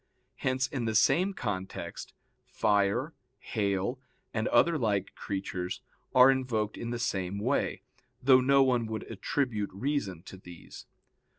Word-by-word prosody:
Hence 130 0 0
in 130 -2 -3
the 110 -1 -1
same 185 - +3
context, 95 - -5 0.3
fire, 100 -2 +1 0.2
hail, 100 +4 -1 0.3
and 110 0 0
other 170 0 +4
like 105 -8 0
creatures, 95 -2 -4 0.3
are 130 +1 +8
invoked 115 -5 -1
in 115 - -5
the 120 - -2
same 95 -5 -2
way, 125 +7 -1 0.4
though 130 0 +6
no 135 +1 +5
one 125 -3 +1
would 110 0 -4
attribute 115 -8 -1
reason 100 - -2
to 95 - -10
these. 90 -3 -12
110 Hz, 130 wpm, -29 LUFS, 100-130 Hz, 0.4 s, are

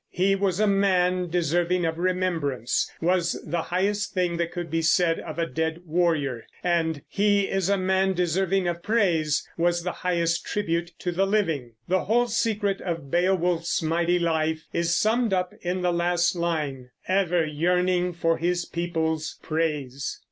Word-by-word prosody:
"He 190 +2 +2
was 195 -2 0
a 215 - +4
man 185 -3 +2
deserving 175 +1 +1
of 165 0 -2
remembrance" 170 -9 0
was 175 0 +1
the 170 -1 -1
highest 200 +5 -1
thing 175 -2 0
that 170 0 -1
could 175 -1 -5
be 165 0 +1
said 165 +1 +3
of 155 -2 -7
a 170 - +1
dead 160 0 -2
warrior; 155 -7 0 0.2
and 165 -4 0
"He 205 0 +2
is 195 -1 -1
a 200 - +3
man 190 0 +1
deserving 180 +2 +1
of 170 0 -2
praise" 170 -9 +1
was 175 0 +1
the 180 - -1
highest 170 -2 0
tribute 170 -4 -2
to 180 - -3
the 190 +3 +1
living. 165 - 0
The 185 +1 +1
whole 240 +4 +3
secret 210 -4 0
of 165 -6 -4
Beowulf's 175 -2 +1
mighty 170 +2 +1
life 160 -2 0
is 170 0 +1
summed 225 0 +2
up 180 -1 0
in 180 +1 -2
the 175 -1 +2
last 175 +1 +1
line, 150 -7 -2 0.2
"Ever 180 -3 +2
yearning 180 +3 +1
for 165 -1 +1
his 175 +1 0
people's 160 -2 -2
praise." 150 -5 -2
175 Hz, 160 wpm, -25 LUFS, 165-185 Hz, 0.2 s, a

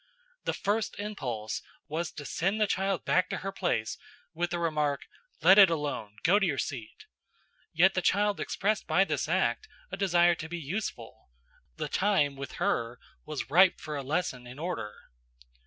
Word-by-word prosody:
The - - 0
first 210 +2 -1
impulse 125 - -4 0.3
was 160 +2 -3
to 145 - -8
send 195 +9 -1
the 215 - +4
child 195 -1 -1
back 185 - +2
to - - -2
her 195 - -1
place 175 - -1 0.3
with 175 +1 -1
the 175 - -2
remark, 150 -4 0 0.4
"Let 190 +3 +8
it 195 -3 +9
alone; 145 -10 -3
go 185 +5 +5
to 200 - +2
your 145 -5 -1
seat." 120 -7 -5 0.7
Yet 185 +4 +4
the 185 - 0
child 205 +2 +2
expressed 210 +2 -1
by 195 - +4
this - - -2
act 435 - +1 0.2
a - - -4
desire 175 -3 +4
to 160 -1 -7
be 175 - -4
useful; 170 - -5 0.5
the - - -2
time, 185 -8 +2
with 140 -1 -7
her, 115 +1 -1 0.3
was 150 -3 -5
ripe 185 +3 +6
for 150 -1 -5
a 140 - -2
lesson 135 -4 -2
in 125 +2 -10
order. 155 -10 -3
170 Hz, 170 wpm, -29 LUFS, 145-195 Hz, 0.7 s, it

